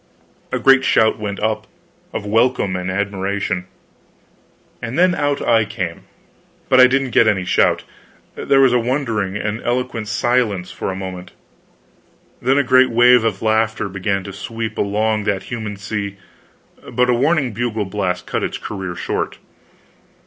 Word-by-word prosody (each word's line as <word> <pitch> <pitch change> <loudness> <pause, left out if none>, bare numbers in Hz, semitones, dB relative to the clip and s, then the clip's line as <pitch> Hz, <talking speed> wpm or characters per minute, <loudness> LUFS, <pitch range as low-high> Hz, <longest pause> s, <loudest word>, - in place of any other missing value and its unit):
A - - 0
great 135 0 +5
shout 110 -4 +3
went 100 -2 -4
up, 110 0 -1 0.4
of - - -5
welcome 115 -2 +1
and 90 0 -3
admiration. 95 -1 -2 1.1
And 115 +3 -4
then 180 +1 +4
out 145 -3 -1
I 115 -1 +4
came. 95 -5 -5 0.6
But 130 - +5
I 130 - +9
didn't 135 0 0
get 115 - +4
any 95 -4 +1
shout. 90 - +2 0.5
There 135 - +2
was 130 -2 +5
a 125 - +4
wondering 115 -6 -1
and 105 +2 -3
eloquent 120 -2 -2
silence 110 -5 0
for - - -4
a - - -5
moment, 95 -1 -7 1.1
then 130 +3 +2
a 145 - +4
great 130 0 +5
wave 120 0 +5
of 110 -3 -1
laughter 110 -1 +1
began 100 0 -2
to 100 +1 -8
sweep 115 +3 -5
along 105 +1 0
that 100 -3 -1
human 110 -3 -5
sea, 100 0 -4 0.7
but 125 0 +2
a - - +3
warning 140 +1 +1
bugle 110 -1 -2
blast 95 -2 -2
cut - - -2
its - - -2
career 95 -4 -6
short. - - -3
110 Hz, 155 wpm, -19 LUFS, 100-125 Hz, 1.1 s, I